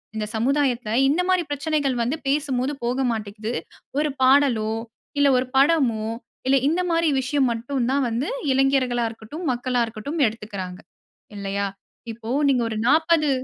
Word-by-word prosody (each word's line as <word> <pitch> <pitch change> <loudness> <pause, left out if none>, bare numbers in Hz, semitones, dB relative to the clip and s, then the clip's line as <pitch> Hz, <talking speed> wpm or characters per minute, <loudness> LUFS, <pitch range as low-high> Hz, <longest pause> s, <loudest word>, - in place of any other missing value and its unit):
இந்த 215 -1 -2
சமுதாயத்ல 250 -1 +1 0.2
இந்த 320 +6 +2
மாரி 370 -1 +3
பிரச்சனைகள் 285 -2 0
வந்து 260 +7 -1
பேசும்போது 275 -1 0
போக 245 +2 0
மாட்டிக்கிது. 215 +1 -4 0.5
ஒரு 300 0 +1
பாடலோ, 260 -5 +4 0.5
இல்லை 285 0 +5
ஒரு 255 - +1
படமோ, 270 -7 +3 0.4
இல்லை 270 +1 +5
இந்த 335 +5 +1
மாரி 330 -1 +2
விஷயம் 265 0 +1
மட்டும் 235 +2 -2
தான் 275 0 +2
வந்து, 235 +4 -2 0.2
இளைஞர்களா 265 -2 +2
இருக்கட்டும், 225 +9 -9
மக்களா 245 0 -1
இருக்கட்டும் 230 +8 -4
எடுத்துக்கிறாங்க. 200 -4 -6 0.6
இல்லையா? 200 0 -2 0.4
இப்போ 225 0 -9 0.2
நீங்க 255 -3 +3
ஒரு 220 - -3
40 315 +1 +3
255 Hz, 140 wpm, -23 LUFS, 225-285 Hz, 0.6 s, இல்லை